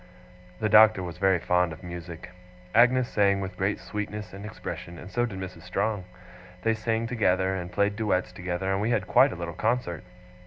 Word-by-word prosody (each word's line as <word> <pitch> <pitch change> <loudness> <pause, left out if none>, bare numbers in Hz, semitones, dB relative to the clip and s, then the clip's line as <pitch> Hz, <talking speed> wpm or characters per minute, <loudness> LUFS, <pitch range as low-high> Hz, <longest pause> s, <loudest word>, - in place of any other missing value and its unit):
The 110 - +1
Doctor 105 -2 +6
was 85 -1 -7
very 95 -1 +4
fond 90 0 +1
of 80 - -10
music. 85 0 -8 0.4
Agnes 125 +2 +5
sang 100 -4 +2
with 95 -1 -5
great 95 +2 -1
sweetness 105 -1 -5
and 100 +2 -7
expression, 85 -4 -7
and 95 - -10
so 120 0 +1
did 100 -4 -7
Mrs. 95 -3 -7
Strong. 100 +2 -2 0.6
They 115 - +3
sang 110 +1 -1
together, 95 -6 +1
and 90 -2 -4
played 100 +1 +1
duets 100 -5 0
together, 90 +1 -3
and 95 +1 0
we 110 - 0
had 120 - +1
quite - - +5
a - - -5
little 85 0 -5
concert. 110 -7 -1
95 Hz, 190 wpm, -27 LUFS, 90-110 Hz, 0.6 s, Doctor